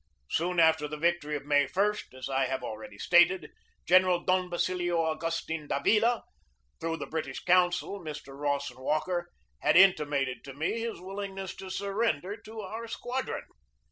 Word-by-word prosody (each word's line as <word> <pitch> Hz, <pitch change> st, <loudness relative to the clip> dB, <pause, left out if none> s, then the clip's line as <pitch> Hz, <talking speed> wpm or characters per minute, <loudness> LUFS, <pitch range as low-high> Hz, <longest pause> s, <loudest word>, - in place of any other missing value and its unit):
Soon 175 Hz, +2 st, +1 dB
after 160 Hz, -2 st, +4 dB
the 150 Hz, +1 st, -6 dB
victory 170 Hz, -2 st, 0 dB
of 140 Hz, -, -5 dB
May 145 Hz, -1 st, +3 dB
i, 200 Hz, +8 st, +2 dB, 0.2 s
as 130 Hz, -, -5 dB
I 135 Hz, 0 st, +1 dB
have 130 Hz, 0 st, -3 dB
already 110 Hz, -1 st, -7 dB
stated, 175 Hz, -, +4 dB, 0.3 s
General 185 Hz, 0 st, +5 dB
Don 185 Hz, -1 st, +1 dB
Basilio 175 Hz, 0 st, 0 dB
Augustin 160 Hz, -1 st, -2 dB
Davila, 225 Hz, +12 st, +2 dB, 0.6 s
through 165 Hz, 0 st, -2 dB
the -, -, -5 dB
British 160 Hz, 0 st, -4 dB
consul, 180 Hz, +2 st, +3 dB
Mr. 150 Hz, -5 st, -8 dB
Rawson 140 Hz, -2 st, -2 dB
Walker, 175 Hz, +5 st, -1 dB, 0.3 s
had -, -, +4 dB
intimated 145 Hz, -9 st, +4 dB
to 135 Hz, -1 st, -9 dB
me 160 Hz, +10 st, -1 dB
his 230 Hz, -3 st, -4 dB
willingness 195 Hz, 0 st, -6 dB
to 190 Hz, -, -8 dB
surrender 200 Hz, -2 st, -1 dB
to 220 Hz, 0 st, -9 dB
our 220 Hz, +4 st, -6 dB
squadron. 250 Hz, +3 st, -3 dB
175 Hz, 150 wpm, -29 LUFS, 145-190 Hz, 0.6 s, General